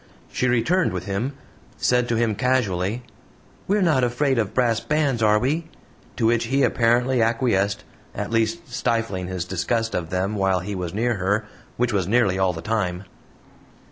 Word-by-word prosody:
She 130 - 0
returned 160 +10 +2
with - - -4
him; 105 +7 -2 0.4
said 125 -1 +1
to 120 - +1
him 115 -1 +1
casually: 110 -2 0 0.6
"We're 205 0 +2
not 150 -7 +3
afraid 125 +2 +1
of 105 -4 -1
brass 120 -3 +2
bands, 145 -5 0
are 105 -1 +4
we?" 150 +9 -1 0.5
to 115 - 0
which 115 +1 +2
he 135 +4 +1
apparently 120 +2 +2
acquiesced, 115 -4 +1 0.3
at 105 +2 -4
least 115 +10 0
stifling 115 -7 -1
his 90 -2 -3
disgust 115 +6 -1
of 85 -2 -2
them 95 +3 -1
while 95 -3 +1
he 100 +3 -5
was 90 -3 -4
near 115 +3 0
her 100 +3 0 0.3
which 120 -1 0
was 95 -4 0
nearly 100 -4 +2
all 95 -1 +3
the 80 -1 -8
time. 95 -5 -1
115 Hz, 170 wpm, -23 LUFS, 95-125 Hz, 0.6 s, are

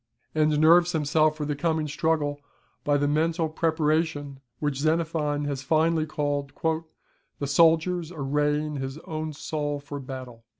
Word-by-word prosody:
] - - -45
and 155 -1 +2
nerves 170 +3 +6
himself 155 0 +2
for 150 - -3
the 145 0 -1
coming 160 +1 0
struggle 150 -1 0 0.4
by 145 0 +2
the 145 0 +1
mental 160 +3 +1
preparation 155 -3 0 0.2
which 145 -3 -1
Xenophon 155 -2 0
has 140 -2 -3
finely 160 +2 +2
called 145 -2 -2 0.9
"the 140 - -3
soldier's 165 +3 +3
arraying 150 0 0
his 135 +1 -4
own 155 0 -4
soul 145 -1 -3
for 145 0 -7
battle." 130 -3 -8
150 Hz, 140 wpm, -26 LUFS, 145-160 Hz, 0.9 s, nerves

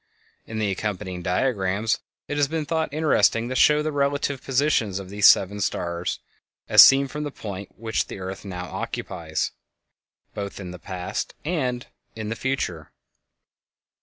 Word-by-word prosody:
In 110 - -5
the 105 -2 0
accompanying 95 -3 -3
diagrams 100 +2 0 0.3
it 145 - -3
has 145 -1 +3
been 160 +1 -2
thought 160 -1 -1
interesting 145 -6 +2
to 130 - -3
show 150 +3 +5
the 155 - -1
relative 140 -1 0
positions 130 -7 +1
of 95 -1 -7
these 105 0 +5
seven 100 +2 +4
stars, 85 -2 -2 0.5
as - - +10
seen 135 +1 +6
from 150 +3 -5
the 145 - -3
point 100 -7 -8
which 110 0 -1
the - - -7
earth 95 +1 -6
now 90 -2 -5
occupies, 80 - -3 0.8
both 100 -1 -5
in 90 -2 -6
the 90 - -9
past 90 0 -4
and 130 -7 -1 0.3
in 110 -1 -5
the 115 - -2
future. 110 - -3
110 Hz, 155 wpm, -24 LUFS, 95-140 Hz, 0.8 s, as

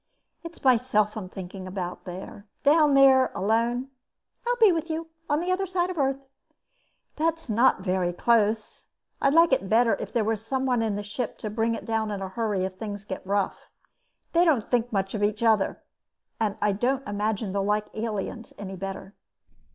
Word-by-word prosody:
"It's 335 0 -10
myself 230 -5 +3
I'm 200 -4 -6
thinking 185 0 -8
about. 180 -1 -5 0.6
Down 295 -1 +5
there, 265 -1 +6
alone." 235 +6 0 0.6
"I'll - - +2
be 440 -4 +7
with 330 -1 -2
you. 325 +1 -3 0.2
On 295 - +2
the 355 +2 -1
other 385 +1 0
side 365 0 0
of - - -6
the - - +2
Earth." 270 0 -1 0.9
"That's 325 -2 -1
not 230 -1 +3
very 185 -2 0
close. 215 +2 +1 0.4
I'd 275 +2 +3
like 330 -3 +6
it 195 -7 0
better 230 0 +4
if - - -6
there 230 - +1
were 225 +1 +1
someone 250 +2 -1
in 220 -3 0
the 205 - -4
ship 215 +3 -4
to 215 - -5
bring 225 +1 0
it - - -8
down 220 -1 -1
in 205 -2 -3
a 190 -1 -4
hurry 205 -2 -1
if 185 0 -7
things 205 -2 -6
get 190 - -5
rough. 200 0 -1 0.6
They 340 +1 +5
don't 290 -11 +2
think 245 -1 +1
much 195 -2 -1
of 215 - -3
each 210 +2 0
other. 220 -3 +2 0.6
I 210 -1 +1
don't 255 +7 -1
imagine 205 0 -2
they'll 200 -1 0
like 210 +1 +1
aliens 225 +1 -4
any 195 -1 -6
better." 195 +1 -6
225 Hz, 180 wpm, -26 LUFS, 205-270 Hz, 0.9 s, be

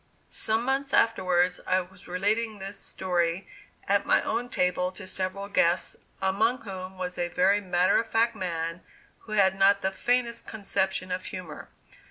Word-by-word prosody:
Some 220 +1 0
months 270 +1 0
afterwards, 185 -5 +2
I 185 - +3
was 185 +1 -11
relating 210 +5 0
this 195 0 -7
story 175 -1 -1 0.4
at - - +3
my - - +4
own 245 +1 -2
table 180 -2 +1
to - - -9
several 185 +1 -3
guests, 175 -3 +2 0.2
among 220 +7 +1
whom 190 -2 -7
was 180 -1 -4
a 175 - +1
very 190 +4 +3
matter 180 -1 +3
of 230 - -3
fact 230 +1 +2
man 165 -2 -3 0.4
who 215 - -9
had 195 -3 +4
not 200 0 +5
the 190 - +1
faintest 240 +3 0
conception 190 -3 -1
of 180 0 -2
humor. 180 -5 -7
190 Hz, 160 wpm, -27 LUFS, 180-215 Hz, 0.4 s, not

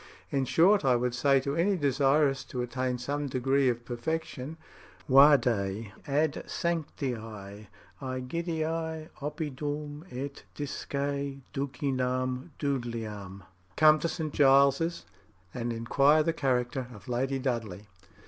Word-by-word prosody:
In 135 -1 +1
short, 185 +9 +4
I 130 -2 +4
would 120 0 0
say 135 +3 +3
to 140 +1 -2
any 190 +4 +2
desirous 140 -1 +2
to 125 -1 -3
attain 125 +1 -2
some 145 +4 -2
degree 135 +1 +2
of 120 0 -3
perfection, 145 +3 -4 0.5
'Vade 120 -7 +4 0.2
ad 145 +1 +1
Sancti 160 -5 -2
Egidii 130 - -5
oppidum, 150 0 -4
et 140 +2 -5
disce 145 -1 -5 0.7
Ducinam 130 -1 -1
Dudleyam' 110 -8 -4 0.3
('Come 155 0 +6
to 170 - -1
St. 155 -4 -4
Giles, 140 +4 +4 0.5
and 120 -1 -2
inquire 135 +7 +3
the 165 - +1
character 130 -3 0
of 105 0 -13
Lady 130 +2 0
Dudley')." 115 -7 -3
135 Hz, 110 wpm, -29 LUFS, 120-150 Hz, 0.7 s, Come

